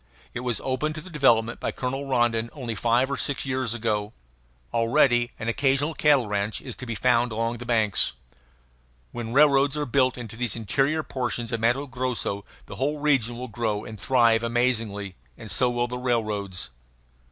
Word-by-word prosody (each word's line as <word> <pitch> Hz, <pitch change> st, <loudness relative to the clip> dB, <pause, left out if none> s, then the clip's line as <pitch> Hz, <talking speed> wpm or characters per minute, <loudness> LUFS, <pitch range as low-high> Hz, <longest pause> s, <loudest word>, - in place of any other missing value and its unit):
It -, -, -3 dB
was 120 Hz, -3 st, -2 dB
opened 150 Hz, +4 st, -1 dB
to 155 Hz, -, -6 dB
development 120 Hz, -8 st, +2 dB
by -, -, -2 dB
Colonel 135 Hz, +2 st, -3 dB
Rondon 120 Hz, -3 st, +1 dB
only 125 Hz, -6 st, -4 dB
five 120 Hz, +5 st, +1 dB
or -, -, -1 dB
six 140 Hz, -2 st, -1 dB
years 130 Hz, -3 st, -1 dB
ago. 105 Hz, -2 st, -1 dB, 0.6 s
Already 120 Hz, +1 st, +3 dB
an 110 Hz, -, -5 dB
occasional 135 Hz, +5 st, +1 dB
cattle 145 Hz, -5 st, +4 dB
ranch 105 Hz, 0 st, -1 dB
is 125 Hz, -4 st, -8 dB
to 125 Hz, -, -7 dB
be 115 Hz, -, -3 dB
found 115 Hz, +3 st, +2 dB
along 115 Hz, +2 st, -1 dB
the 120 Hz, -, -8 dB
banks. 110 Hz, -4 st, +2 dB, 1.0 s
When 115 Hz, -1 st, -5 dB
railroads 140 Hz, +1 st, +4 dB
are 150 Hz, -, -1 dB
built 130 Hz, 0 st, +2 dB
into 115 Hz, -3 st, -7 dB
these 120 Hz, -2 st, -2 dB
interior 135 Hz, +8 st, 0 dB
portions 120 Hz, -3 st, -3 dB
of 115 Hz, -, -1 dB
Matto 120 Hz, +5 st, +1 dB
Grosso 125 Hz, -6 st, -2 dB, 0.2 s
the 100 Hz, -, -9 dB
whole 145 Hz, +4 st, -1 dB
region 135 Hz, -6 st, +1 dB
will 125 Hz, +1 st, -5 dB
grow 110 Hz, -2 st, -2 dB
and 110 Hz, -3 st, -9 dB
thrive 115 Hz, -3 st, +3 dB
amazingly 115 Hz, -5 st, -1 dB, 0.2 s
and 105 Hz, -, -7 dB
so 125 Hz, +6 st, +3 dB
will 120 Hz, 0 st, 0 dB
the 125 Hz, +1 st, -5 dB
railroads. 105 Hz, -, -1 dB
120 Hz, 175 wpm, -25 LUFS, 115-135 Hz, 1.0 s, cattle